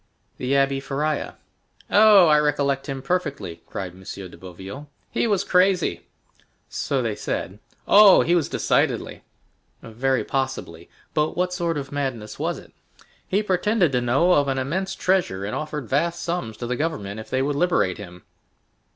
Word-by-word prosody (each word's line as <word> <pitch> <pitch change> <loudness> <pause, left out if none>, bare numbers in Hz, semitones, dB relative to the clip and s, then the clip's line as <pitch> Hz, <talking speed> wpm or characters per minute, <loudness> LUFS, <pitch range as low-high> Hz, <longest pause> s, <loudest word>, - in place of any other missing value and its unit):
"The 130 +1 -1
Abbé 135 0 +2
Faria." 145 +2 -2 0.6
"Oh, 210 -3 +7
I 150 -2 +5
recollect 140 -1 0
him 135 -1 -4
perfectly," 145 - -3
cried 95 -2 -5
M. 95 - -15
de 95 -1 -8
Boville; 95 +11 -10 0.2
"he - - 0
was 200 -3 +1
crazy." 180 - +2 0.6
"So 135 -3 -2
they 115 -2 -1
said." 100 -1 -4 0.3
"Oh, 205 -1 +8
he 170 - +1
was, 170 -5 +1
decidedly." - - 0 0.6
"Very 125 +4 -1
possibly; 130 -11 -4 0.2
but 155 +2 0
what 180 0 0
sort 170 -3 -1
of 135 -2 -5
madness 130 -7 -4
was - - -1
it?" - - -14 0.5
"He 200 +3 +1
pretended 190 -2 +1
to 125 -1 +1
know 135 +9 +2
of 145 -3 +3
an 135 -1 -1
immense 190 +9 -2
treasure, 180 - 0
and 105 - -4
offered 150 -4 -4
vast 165 +7 0
sums 170 -11 -3
to 120 - -5
the 125 +1 -2
government 110 -9 -3
if 110 - -10
they 130 0 0
would 145 +1 -1
liberate 145 - +1
him." 90 -3 -10
140 Hz, 160 wpm, -23 LUFS, 120-175 Hz, 0.6 s, Oh